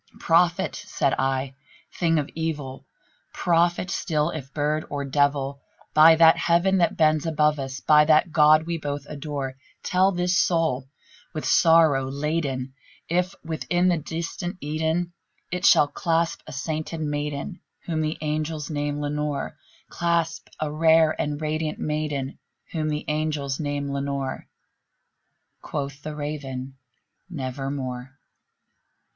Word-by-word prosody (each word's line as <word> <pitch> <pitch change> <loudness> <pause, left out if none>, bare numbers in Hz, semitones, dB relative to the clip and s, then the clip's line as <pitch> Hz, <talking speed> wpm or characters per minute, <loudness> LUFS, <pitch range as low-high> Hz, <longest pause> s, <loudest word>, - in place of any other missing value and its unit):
"Prophet!" 170 +2 +2
said 135 - 0
I, 135 0 0 0.4
"thing 165 -2 +1
of 145 -2 0
evil! 150 -5 -4 0.5
prophet 175 +1 +1
still, 155 -3 0
if 135 -5 -7
bird 150 +1 0
or 140 -1 -3
devil! 140 0 0 0.3
By 160 +1 +8
that 165 +1 +6
Heaven 175 +3 +2
that 170 - +2
bends 155 0 +3
above 150 -1 +2
us 135 -1 -5
by 150 0 +5
that 155 +2 +4
God 155 0 +6
we 170 0 -3
both 145 -1 -4
adore 140 -3 -5 0.3
Tell 185 +2 +3
this 180 0 0
soul 160 -7 +1 0.5
with 155 - -3
sorrow 160 -5 +4
laden 140 -2 -2 0.4
if, 180 +2 0
within 175 +3 0
the 175 - +2
distant 170 +4 -5
Aidenn, 160 +3 -1 0.4
It 180 +2 +1
shall 145 - +6
clasp 165 +2 0
a - - -8
sainted 155 +2 -4
maiden 150 +3 -3 0.3
whom 160 -2 -1
the 155 0 -1
angels 155 0 -2
name 145 0 -2
Lenore 145 0 -2 0.3
Clasp 170 -1 -1
a 155 -1 -2
rare 160 0 +4
and 145 -1 -2
radiant 155 0 -2
maiden 150 -3 -3 0.3
whom 155 -2 -1
the 150 0 -3
angels 150 -3 -1
name 145 -2 -2
Lenore." 140 -1 -3 1.1
Quoth 140 -1 -5
the 155 0 -6
Raven, 140 -3 -5 0.6
"Nevermore." 135 -3 -5
150 Hz, 130 wpm, -24 LUFS, 140-165 Hz, 1.1 s, By